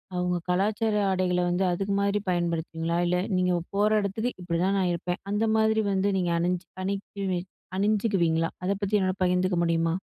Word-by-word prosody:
அவங்க 180 0 0
கலாச்சார 210 +4 +1 0.2
ஆடைகள 185 -1 +1
வந்து 175 +2 +1
அதுக்கு 195 +3 -1
மாரி 200 +1 +1
பயன்படுத்துவீங்களா? 170 -1 -1
இல்ல 180 +1 +2 0.2
நீங்க 180 0 +2 0.2
போற 210 +1 +3
இடத்துக்கு 220 +5 -2
இப்டி 170 -1 -2
தான் 195 +1 +1
நான் 180 -2 +1
இருப்பேன் 175 +1 -3
அந்த 210 +2 +1
மாதிரி 220 0 +3
வந்து 195 +1 +1
நீங்க 175 -1 0
அணிஞ்சு 180 +1 -1 0.2
அணி 195 +1 0 0.8
அணிஞ்சுக்குவீங்களா 195 -5 +1
அத 185 - 0
பத்தி 200 +1 0
என்னால 185 -1 +1
பகிர்ந்துக்க 180 0 +2
முடியுமா? 165 -1 +1
185 Hz, 160 wpm, -27 LUFS, 175-200 Hz, 0.8 s, போற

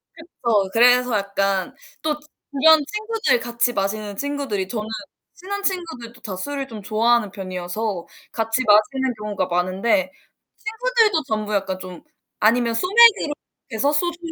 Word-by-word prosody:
그쵸. 235 - -1
그래서 245 -1 +4
약간 195 -1 -1 0.3
또 305 -1 -1
주변 300 +1 +3
친구들 435 - 0
같이 240 +1 0
마시는 205 +1 -2
친구들이 280 -9 -2
저는 215 0 -4 0.5
친한 405 +3 -6
친구들도 255 -12 -4
다 195 -4 -5
술을 275 +7 -4
좀 220 -4 -9
좋아하는 220 +1 +2
편이어서 185 0 -4 0.2
같이 225 +2 -1
마시는 245 +5 +3
경우가 205 -3 -2
많은데 185 +2 0 0.5
친구들도 445 -6 +1
전부 215 -1 -2
약간 190 -2 -1
좀 185 -1 -9 0.4
아니면 230 +2 +3
소맥으로 400 - +5 0.4
해서 275 +6 +1
소주는 340 +2 -2
235 Hz, 310 characters per minute, -22 LUFS, 200-300 Hz, 0.5 s, 소맥으로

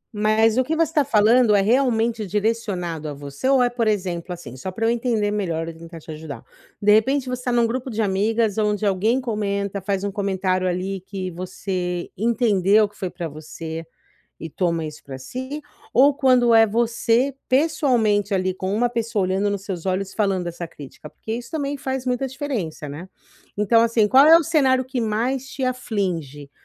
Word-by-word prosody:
Mas 215 +3 +3
o - - +4
que 320 +5 -2
você 330 - +3
está 295 -3 +3
falando 225 -2 +4
é 195 - +4
realmente 230 -2 +1
direcionado 190 -6 -2
a 145 - -6
você 140 - -4
ou 265 -2 +5
é 245 - +2
por 235 -2 -1
exemplo, 180 -4 -2
assim, 175 -7 -8
só 185 +9 -6
para 225 +4 -2
eu - - +3
entender 230 -3 0
melhor 170 -6 -2
e 165 - -6
tentar 165 0 -11
te 160 - -10
ajudar. 155 -2 -8 0.3
De 210 0 +3
repente 265 +5 +2
você 250 0 -3
está 250 - -2
em 240 - +1
um 235 - +4
grupo 255 +3 -3
de 225 -1 -5
amigas 215 +2 +1
aonde 210 0 0
alguém 210 +6 +2
comenta, 200 -4 -2
faz 195 0 -2
um 200 - -2
comentário 190 -2 -1
ali 185 +1 -2
que 190 -1 -6
você 180 0 -4
entendeu 215 -2 +3
que 205 - -23
foi 185 - -4
para 175 -2 -5
você, 160 +2 -7 0.6
e 165 - -7
toma 170 -2 -1
isso 150 -1 -7
para 135 -1 -7
si, 260 - -6 0.3
ou 280 +4 +6
quando 255 -4 +3
é 225 0 +7
você 235 +4 +1 0.2
pessoalmente 240 - +2
ali 185 0 0
com 190 +2 -3
uma 240 +2 +2
pessoa 230 -3 -1
olhando 190 +2 0
nos 200 -1 -2
seus 190 -4 -6
olhos 190 +1 -1
e - - -14
falando 195 -4 0
essa 170 0 -6
crítica? 150 0 -12
Porque 220 - -8
isso 240 +5 -7
também 285 -2 -2
faz 265 -1 -3
muita 250 +1 -1
diferença, 245 - -4
né. 160 +6 -8 0.5
Então, 210 +3 +4
assim, 230 -2 +3
qual 270 +5 +7
é 325 +1 +9
o 335 - +3
cenário 260 -4 +2
que 255 -1 -3
mais 240 +5 -1
te 270 - -6
aflige? 180 - -3
210 Hz, 195 wpm, -22 LUFS, 185-245 Hz, 0.6 s, é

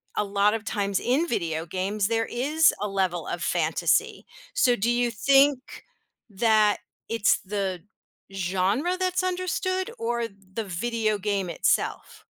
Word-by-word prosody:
a - - +1
lot 200 +1 +2
of 225 -1 -3
times 200 -2 -1
in 280 +8 +1
video 165 - -2
games, 195 +4 -1
there 225 0 0
is 300 +7 +3
a 210 - 0
level 190 -3 -1
of - - -4
fantasy, - - 0 0.3
so 260 - +3
do 235 +2 0
you 240 0 +1
think 275 +3 +2 0.5
that 215 0 +3 0.3
it's 230 -2 +2
the 190 -3 -3 0.5
genre 195 - 0
that's 370 0 0
understood 370 +1 -1
or 235 0 -1
the 195 +1 -8
video 215 +3 -1
game 200 -2 -2
itself? - - -1
215 Hz, 135 wpm, -25 LUFS, 195-255 Hz, 0.5 s, is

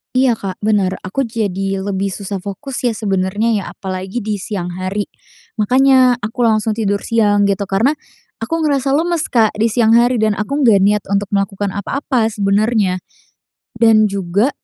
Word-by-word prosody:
Iya, 255 -1 +4
Kak, 195 +1 -6
bener, 200 -3 +1
aku 235 +7 -2
jadi 195 -3 -2
lebih 195 0 -2
susah 195 0 -5
fokus 225 +8 -6
ya 235 -3 +1
sebenernya 200 +2 -1
ya, 205 -3 0
apalagi 190 +3 -5
di 210 -2 -3
siang 180 -3 -4
hari. 185 +3 -3 0.6
Makanya 255 +2 +4
aku 230 +2 0
langsung 220 0 +1
tidur 205 -2 -1
siang 205 -3 +2
gitu 200 0 0
karena 220 +9 +2 0.5
aku 225 +8 -4
ngerasa 275 -2 +1
lemes, 335 0 0
Kak, 225 -4 +3
di 225 - +3
siang 225 0 +2
hari 240 +2 +4
dan 215 -1 +3
aku 275 +7 -1
nggak 215 -5 +5
niat 205 +1 +2
untuk 200 0 0
melakukan 195 0 -2
apa-apa 230 +2 -1
sebenernya. 205 -1 +1 0.8
Dan 220 -2 +4
juga, 200 +5 0
210 Hz, 160 wpm, -17 LUFS, 195-235 Hz, 0.8 s, nggak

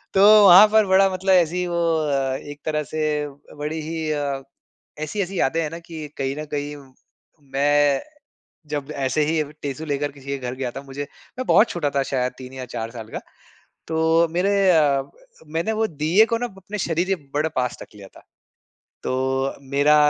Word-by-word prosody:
तो 195 - +5 0.3
वहाँ 190 +4 +10
पर 220 -1 +6
बड़ा 190 +1 +5
मतलब 190 +1 +1
ऐसी 175 -1 +3
ही 180 0 -1
वो 170 0 -1 0.2
अ, 140 -4 0
एक 145 +1 -10
तरह 155 -1 0
से 150 -1 -1 0.3
बड़ी 150 +2 -3
ही 160 0 -4
अ, 140 -2 -2 0.6
ऐसी-ऐसी 190 +4 -3
यादें 160 +5 +1
हैं 150 - -2
ना 165 - -6
कि 160 -3 -7
कहीं 135 0 -2
न 155 - -4
कहीं 145 0 -3 0.8
मैं 145 0 +3 0.7
जब 145 -2 -4 0.2
ऐसे 150 +3 +1
ही 160 0 +1 0.2
टेसू 140 +2 -4
लेकर 145 +1 -2
किसी 140 -1 -16
के 140 0 -2
घर 125 -1 -5
गया 130 -1 -3
था 135 - -7
मुझे 140 +1 -6 0.4
मैं 255 - -3
बहुत 225 - +5
छोटा 155 -5 -1
था 140 - +3
शायद 125 -1 0
3 130 0 -9
या 130 -1 -6
4 115 0 -3
साल 110 -1 -8
का। - - -3 0.7
तो 160 - -1 0.4
मेरे 200 +2 +2 0.2
अ, 145 -5 +4 0.4
मैंने 165 +8 -1
वो - - +3 0.2
दीये 185 +8 +5
को 230 - +2
ना 245 - -2
ब 195 - -18
अपने 210 +2 -5
शरीर 170 +2 0
के 195 - +2 0.2
बड़ा 150 +2 +1
पास 125 -1 -2
रख - - -11
लिया 100 -2 -11
था। - - -14 0.8
तो 130 +1 -1 0.2
मेरा 145 +2 +4
150 Hz, 190 wpm, -22 LUFS, 135-170 Hz, 0.8 s, वहाँ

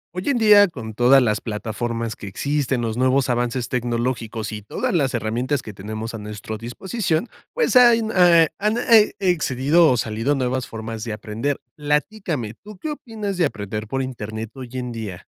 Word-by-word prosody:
Hoy 180 +9 -2
en 275 - +2
día, 210 -3 +7
con 120 - -8
todas 125 +4 +5
las 110 -2 0
plataformas 115 +1 -3
que 100 - -9
existen, 135 +4 -1
los 115 -1 -2
nuevos 130 0 +2
avances 120 0 -1
tecnológicos 120 -2 -2
y 105 -1 -6
todas 100 - -3
las 140 -7 +1
herramientas 120 +5 -1
que 110 - -8
tenemos 110 +4 -6
a 115 - -5
nuestro 105 +1 -7
disposición, 175 - -2 0.2
pues, 480 - +1
hay 240 -2 +7
eh, 170 -3 +6
han 215 +3 +1
e 230 -3 +5
excedido 160 -3 +3
o 125 - +2
salido 115 +6 0
nuevas 130 -1 -1
formas 110 0 -6
de 110 - -4
aprender. 110 +6 -3 0.2
Platícame, 150 - -2
¿tú 210 - -13
qué 305 +11 -4
opinas 215 -8 -5
de 175 - +3
aprender 105 +1 -6
por 135 +4 -2
Internet 110 -3 -6
hoy 130 -3 -9
en 125 -1 -4
día? 110 -6 -7
125 Hz, 175 wpm, -22 LUFS, 110-170 Hz, 0.2 s, día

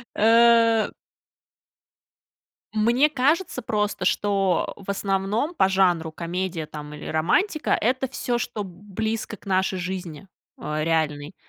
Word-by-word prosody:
Э 230 0 +5 1.8
Мне 240 +7 +3
кажется 290 +2 +1
просто, 210 -5 -1
что 195 -3 +1
в 200 - -15
основном 200 - -1
по 190 - +3
жанру 180 -4 +2
комедия 170 +1 -3
там 150 -1 -9
или 150 - -9
романтика- 305 - 0
это 255 +4 0
всё, 245 -2 -2
что 220 -3 -4
б 190 - -9 0.2
близко 220 +2 -2
к - - -24
нашей 190 -1 0
жизни, 185 -1 -5 0.3
э, 155 0 -3
реальной. 155 -1 -1
195 Hz, 120 wpm, -24 LUFS, 175-230 Hz, 1.8 s, Э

